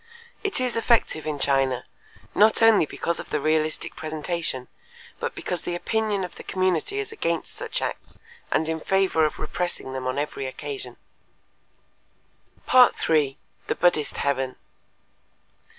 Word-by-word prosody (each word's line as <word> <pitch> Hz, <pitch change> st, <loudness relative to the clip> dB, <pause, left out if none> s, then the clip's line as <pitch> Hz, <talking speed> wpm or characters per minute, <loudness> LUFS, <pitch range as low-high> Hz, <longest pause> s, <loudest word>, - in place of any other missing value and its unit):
It 405 Hz, -8 st, 0 dB
is 250 Hz, -2 st, 0 dB
effective 230 Hz, -9 st, +2 dB
in 150 Hz, -1 st, -1 dB
China, 135 Hz, -2 st, +2 dB, 0.5 s
not 220 Hz, +2 st, +5 dB
only 220 Hz, -8 st, +6 dB
because 170 Hz, +3 st, -1 dB
of -, -, -7 dB
the 150 Hz, -, 0 dB
realistic 155 Hz, +1 st, 0 dB
presentation, 155 Hz, -4 st, -3 dB, 0.5 s
but -, -, -3 dB
because 180 Hz, -, -2 dB
the 175 Hz, -, -3 dB
opinion 210 Hz, +1 st, 0 dB
of 180 Hz, -, -6 dB
the -, -, -9 dB
community 185 Hz, -, 0 dB
is 420 Hz, +1 st, -3 dB
against 170 Hz, -, -2 dB
such -, -, -3 dB
acts -, -, -5 dB, 0.3 s
and 160 Hz, -, +1 dB
in 160 Hz, 0 st, -1 dB
favor 190 Hz, -2 st, +2 dB
of 150 Hz, -, -2 dB
repressing 175 Hz, -7 st, -3 dB
them 130 Hz, -1 st, -3 dB
on 130 Hz, +2 st, -1 dB
every 145 Hz, -2 st, -2 dB
occasion. 400 Hz, -, -6 dB, 1.7 s
_3. 160 Hz, -, +4 dB, 0.3 s
The -, -, 0 dB
Buddhist 165 Hz, -4 st, +2 dB
Heaven. 135 Hz, -2 st, 0 dB
160 Hz, 135 wpm, -25 LUFS, 145-205 Hz, 1.7 s, only